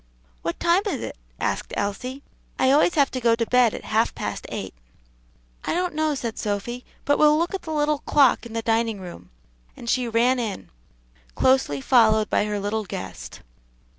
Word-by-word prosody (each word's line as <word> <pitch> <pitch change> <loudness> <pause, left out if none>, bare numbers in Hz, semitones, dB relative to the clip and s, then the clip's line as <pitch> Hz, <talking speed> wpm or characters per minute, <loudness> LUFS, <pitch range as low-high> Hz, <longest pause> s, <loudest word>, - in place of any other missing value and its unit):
"What 170 - -3
time 345 +2 +3
is - - -2
it?" - - -6 0.2
asked - - -2
Elsie. 250 +7 -3 0.3
"I 260 - +3
always 305 +5 +4
have 280 -2 +3
to 255 - -4
go 230 -1 +4
to 230 0 -1
bed 245 -2 +3
at - - -8
half 220 +1 +1
past - - -5
eight." - - -5 0.9
"I - - -1
don't 360 0 -1
know," 310 -1 0
said 235 -4 -4
Sophy, 215 +4 -3 0.2
"but 285 - +2
we'll 300 0 +6
look 340 +3 -1
at 390 - -3
the 300 -2 0
clock 280 -4 +4
in 225 - -12
the 230 0 -2
dining 225 -2 0
room," 175 - -10 0.5
and 235 - -10
she 250 +1 +1
ran 240 +3 +2
in, 220 -5 -5 0.6
closely 260 - +2
followed 220 - +4
by - - +2
her 210 -1 -2
little 210 +2 -2
guest. 95 - -7
240 Hz, 180 wpm, -24 LUFS, 215-285 Hz, 0.9 s, we'll